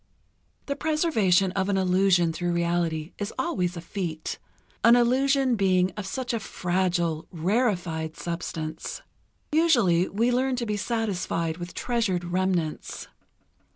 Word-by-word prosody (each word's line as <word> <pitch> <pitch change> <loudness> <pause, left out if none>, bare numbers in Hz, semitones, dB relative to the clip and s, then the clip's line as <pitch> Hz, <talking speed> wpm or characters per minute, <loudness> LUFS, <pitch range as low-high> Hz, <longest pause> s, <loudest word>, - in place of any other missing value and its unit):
The 280 - -2
preservation 220 - +2
of 190 +1 -1
an 200 - +2
illusion 180 -2 +3
through 175 +1 -1
reality 170 -2 0
is 205 0 -3
always 180 - -1
a - - -5
feat, 170 -3 -4 0.4
an 230 +1 +8
illusion 260 +1 +3
being 185 -2 +2
of 210 -2 -5
such 250 +4 -3
a 230 - 0
fragile, 175 -4 -1
rarefied 175 -4 -1
substance. 165 -2 -5 0.5
Usually 240 - +4
we 230 +5 +1
learn 255 +1 +1
to 245 -1 -2
be 210 -1 -1
satisfied 195 -7 -1
with 175 -1 -7
treasured 225 -8 0
remnants. 175 -2 -2
185 Hz, 125 wpm, -26 LUFS, 170-235 Hz, 0.5 s, an